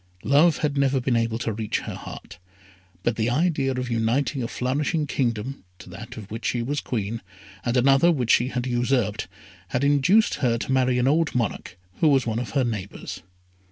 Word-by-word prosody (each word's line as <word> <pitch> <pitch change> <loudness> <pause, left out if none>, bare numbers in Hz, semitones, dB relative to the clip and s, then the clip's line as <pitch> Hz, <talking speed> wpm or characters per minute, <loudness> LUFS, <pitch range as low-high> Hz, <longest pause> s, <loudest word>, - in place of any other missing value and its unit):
Love 150 +4 +4
had 145 -2 -1
never 135 -1 +2
been 125 -1 0
able 115 -1 0
to 115 -2 -2
reach 110 0 -2
her - - -6
heart, - - -10 0.6
but 120 -2 0
the 115 +1 +1
idea 150 0 +1
of 125 -1 -3
uniting 120 +5 0
a 115 - -2
flourishing 145 +6 -1
kingdom 125 -3 -2
to - - -13
that - - -9
of 105 -3 -9
which 110 - -6
she 120 -1 0
was 145 +4 -2
Queen, 115 -1 -3 0.4
and 120 +1 0
another 135 +6 +5
which 125 -8 +1
she 120 - +4
had 125 -2 -3
usurped, 120 -4 0 0.4
had 125 +8 -1
induced 145 +10 +4
her 120 -3 +2
to 120 - -4
marry 130 -1 +2
an 125 +1 +2
old 155 +1 +2
monarch, 115 -6 -2 0.2
who 160 - +3
was 135 -4 +4
one 115 -1 -1
of 125 - -4
her 135 - +3
neighbours. 105 -5 -5
125 Hz, 190 wpm, -24 LUFS, 115-140 Hz, 0.6 s, another